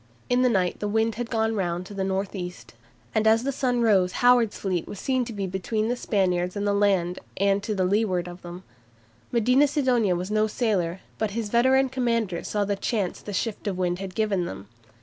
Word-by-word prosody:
In 245 0 +4
the 255 - +4
night 185 -5 0
the 210 - -2
wind 220 +2 +1
had 235 +1 -5
gone 225 -1 +1
round 175 -2 -2
to 205 - -10
the 195 -1 -2
north 190 +1 -2
east, 180 -2 -7 0.4
and 220 0 +2
as 225 +1 +4
the 275 - 0
sun 250 -3 0
rose 190 -5 +3
Howard's 245 -3 +4
fleet 185 -4 -2
was 205 - -7
seen 260 -2 0
to 235 - -6
be 200 -3 -3
between 205 +4 -2
the 245 - +1
Spaniards 180 -5 0
and 205 0 -2
the 205 - +2
land 190 -3 +1 0.2
and 200 +1 +2
to 210 +1 -3
leeward 185 -2 +1
of 175 +1 -9
them. 175 +1 -9 0.7
Medina 250 +5 +4
Sidonia 250 - +2
was 180 +3 -4
no 215 0 +2
sailor, 195 -6 -1 0.2
but 220 - 0
his 225 -3 -2
veteran 260 +4 +4
commanders 230 -8 -1
saw 205 -1 0
the 200 0 0
chance 200 -2 -2
the 205 - -7
shift 210 +2 -3
of 195 - -1
the - - -7
wind 180 -1 0
had 190 -1 -6
given 205 -5 0
them. 95 +1 -8
205 Hz, 215 wpm, -25 LUFS, 185-230 Hz, 0.7 s, In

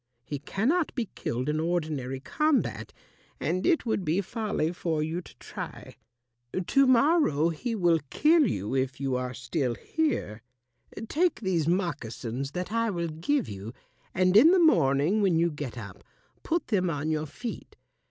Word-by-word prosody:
He 145 +3 -5
cannot 270 - 0
be 240 -6 -2
killed 125 +3 -3
in 150 +1 0
ordinary 155 -6 -2
combat, 305 - 0 0.5
and 185 +2 -1
it 330 -6 +2
would 220 -4 0
be 165 +3 +1
folly 200 -5 -2
for 160 -3 -1
you 165 +3 -3
to - - -16
try. - - -8 0.7
To 275 +6 +4
morrow 255 - +4
he 225 +9 -3
will 175 -5 +3
kill 310 -2 +4
you 105 - -3
if 130 -1 -1
you 135 -2 -1
are 125 0 -3
still 125 -1 -2
here. 250 - -2 0.7
Take 340 +2 +1
these 175 -6 0
moccasins 140 - -2
that 180 +2 -4
I 230 0 +1
will 170 -4 -2
give 205 - -1
you, 100 +3 -7 0.4
and 185 +1 +2
in 235 +9 +9
the 375 - +5
morning 165 - +3
when 185 -5 +3
you 170 +1 +2
get 145 -4 -6
up 100 -5 -9 0.4
put 335 +1 -2
them 185 -5 +1
on 155 0 -2
your 155 0 -1
feet. 225 - -7
170 Hz, 160 wpm, -28 LUFS, 140-225 Hz, 0.7 s, in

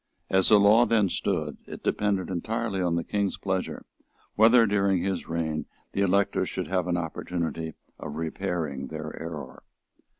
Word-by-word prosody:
As 95 0 +5
the 105 - +7
law 105 +4 +6
then 105 -4 +3
stood, - - -2
it - - -9
depended 100 -3 0
entirely 110 +2 -2
on 85 -2 +1
the 85 - 0
King's 100 +1 -1
pleasure 95 -1 -3 0.5
whether, 115 +2 +6
during 100 -3 +2
his 95 -2 -2
reign, 80 -2 -2 0.2
the 100 - -1
electors 100 +1 +2
should - - -3
have 90 -2 0
an 90 -1 +1
opportunity 80 -1 -3 0.2
of 75 - -6
repairing 80 -3 -3
their 80 -1 -6
error. 80 -5 -7
90 Hz, 155 wpm, -27 LUFS, 80-100 Hz, 0.5 s, the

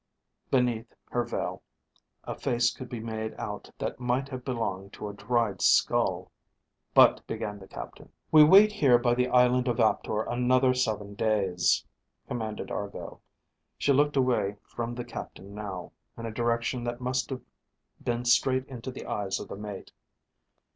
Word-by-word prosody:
Beneath, 120 -3 +1 0.2
her 120 - +1
veil, 120 - -4 0.6
a - - -4
face 120 0 +1
could 130 - -9
be 120 - -5
made 110 -1 -4
out - - -6
that - - -4
might 125 +2 0
have 130 -2 -6
belonged 100 -7 -3
to 105 - -6
a 100 - -6
dried 105 -1 0
skull._ - - +3 0.6
"But," - - +6
began 105 -1 -4
the 95 - -12
captain. - - -9
_"We 155 -1 +4
wait 195 +7 +8
here 140 - +5
by 120 0 +2
the 125 +1 +1
island 125 0 +4
of 120 -1 0
Aptor 110 -1 +2
another 125 +2 +2
seven 110 -5 -1
days," 100 -5 +1 0.4
commanded 110 -3 -4
Argo. 100 -1 -6 0.6
She 140 - +2
looked 145 +1 +3
away 125 -6 +2
from 120 0 -5
the 120 0 -5
captain 100 +2 -8
now, 100 -4 -6 0.3
in 115 - -6
a 115 - -4
direction 120 +2 -1
that 120 0 -3
must 125 0 -1
have 130 -2 -5 0.6
been 120 0 -1
straight 130 +2 +3
into 130 -2 -7
the 130 - -8
eyes 95 -2 -2
of - - -8
the - - -5
mate. 105 -1 -8
120 Hz, 160 wpm, -28 LUFS, 105-125 Hz, 0.6 s, wait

